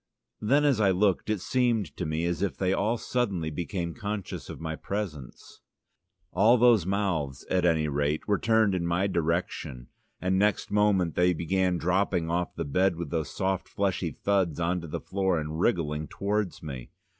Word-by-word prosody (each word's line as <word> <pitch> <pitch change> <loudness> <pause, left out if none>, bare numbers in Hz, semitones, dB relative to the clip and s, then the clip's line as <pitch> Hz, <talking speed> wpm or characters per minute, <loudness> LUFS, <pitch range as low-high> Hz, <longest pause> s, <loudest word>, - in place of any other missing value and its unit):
Then, 140 +7 +3
as 135 -7 +3
I 100 - +4
looked, 95 +1 +1
it 105 -4 0
seemed 120 -4 0
to 90 - -3
me 80 +2 -1
as 85 -1 -1
if 100 - -1
they 95 0 +1
all 115 +4 +1
suddenly 100 -11 -1
became 85 +2 -3
conscious 105 -4 -5
of - - -7
my 80 -1 -4
presence. 85 - -6 0.7
All 115 +5 +5
the 120 -5 +5
mouths, 90 -9 -1
at 90 -1 +2
any 80 -3 +2
rate, 75 +1 -1
were 100 -2 +2
turned 110 -3 +3
in 90 -2 -1
my 85 +3 +1
direction, 85 -8 -2 0.3
and 95 +1 +1
next 105 -1 +1
moment 100 -5 +2
they 90 0 +3
began 90 +2 0
dropping 90 -1 0
off 90 +1 -1
the - - -3
bed 90 +5 +2
with 85 -3 -6
those 80 -2 -1
soft 95 -1 -2
fleshy 100 -2 -1
thuds 95 -6 0
on 85 +1 0
to 85 - -8
the 75 - -4
floor, 95 -3 0
and 75 +1 -4
wriggling 75 -7 0
towards 100 -2 -2
me. 65 -5 -7
90 Hz, 180 wpm, -28 LUFS, 80-100 Hz, 0.7 s, All